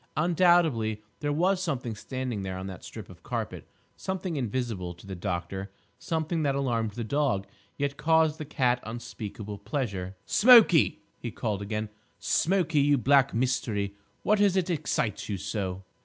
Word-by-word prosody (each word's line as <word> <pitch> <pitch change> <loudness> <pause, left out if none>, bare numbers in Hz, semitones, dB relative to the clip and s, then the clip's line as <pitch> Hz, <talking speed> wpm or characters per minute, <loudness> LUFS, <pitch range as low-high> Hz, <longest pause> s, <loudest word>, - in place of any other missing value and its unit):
Undoubtedly, 160 - +3 0.2
there 145 -1 -1
was 180 +5 +2
something 130 -10 -2
standing 125 0 -4
there 95 -1 -4
on 95 - -5
that 95 -2 -8
strip - - -9
of - - -14
carpet, - - -4 0.3
something 190 -2 -3
invisible 115 - -2
to 85 - -16
the 100 - -6
doctor, 90 +2 -4 0.3
something 160 0 -1
that 140 -2 +1
alarmed 115 -6 0
the 115 - -4
dog, 125 -5 0 0.3
yet 140 0 -1
caused 160 0 +3
the - - -3
cat 125 -4 +1
unspeakable 110 -3 -7
pleasure. 100 -5 -3
"Smokie!" 220 - +6 0.2
he 120 - -4
called 105 -3 -3
again, 105 +1 -3 0.3
"Smokie, 170 -4 +2
you 145 0 +4
black 135 +2 +4
mystery, 115 -5 0 0.3
what 210 0 +3
is 195 -2 +4
it 185 -1 +1
excites 145 - -1
you 100 - -1
so?" 95 -1 -3
125 Hz, 155 wpm, -28 LUFS, 105-155 Hz, 0.3 s, Smokie